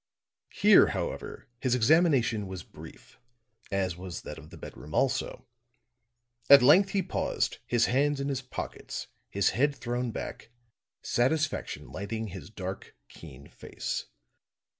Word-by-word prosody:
Here, - - +6
however, - - -5
his 125 -1 +1
examination 125 - +3
was 95 -2 -7
brief, - - -14 0.5
as 95 -3 0
was 90 -2 -7
that - - -7
of - - -14
the - - -12
bedroom 75 +2 -9
also. 135 0 0 1.0
At 140 -3 +10
length 180 +9 +6
he 195 -1 0
paused, - - -1
his 120 -1 +3
hands 145 +3 +1
in 140 - -2
his 135 -2 -2
pockets, 130 - -6 0.2
his 100 -1 +2
head 145 +3 +1
thrown 120 -1 -2
back, 115 - -6 0.5
satisfaction 150 +6 -1
lighting 105 +3 -4
his 95 0 -9
dark, 95 -3 -7
keen 75 -6 -12
face. - - -5
120 Hz, 130 wpm, -29 LUFS, 100-140 Hz, 1.0 s, At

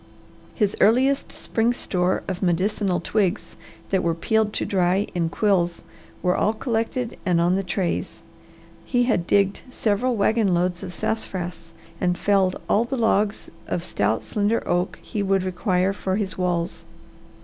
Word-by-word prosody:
His 210 -4 +1
earliest 265 +6 +3
spring 230 +1 0
store 180 -5 0
of 185 -2 -4
medicinal 185 +1 +1
twigs, 200 -5 -1 0.4
that 190 -2 +2
were 170 -1 0
peeled 220 +5 +1
to - - -1
dry 190 +1 +2
in 170 -3 0
quills, 175 -3 +1 0.4
were 180 0 +2
all 215 - +2
collected 230 +1 -2
and 180 -4 +2
on 175 +1 +3
the 195 - +1
trays; 180 -1 -3 0.6
he 245 -1 +1
had 200 -8 +1
digged 200 -1 +2
several 240 +1 0
wagon 210 -2 +2
loads 180 0 0
of - - -6
sassafras 175 -6 -3 0.3
and 180 -1 +1
felled 195 -2 +2
all 215 - +3
the 265 +3 -3
logs 215 -2 +1 0.2
of 170 - -2
stout, 105 -5 0
slender 210 +2 0
oak 175 +1 0
he 210 - -3
would 195 -1 +1
require 185 0 0
for 190 -1 -2
his 200 -2 -2
walls. 175 -2 -1
195 Hz, 150 wpm, -23 LUFS, 180-220 Hz, 0.6 s, earliest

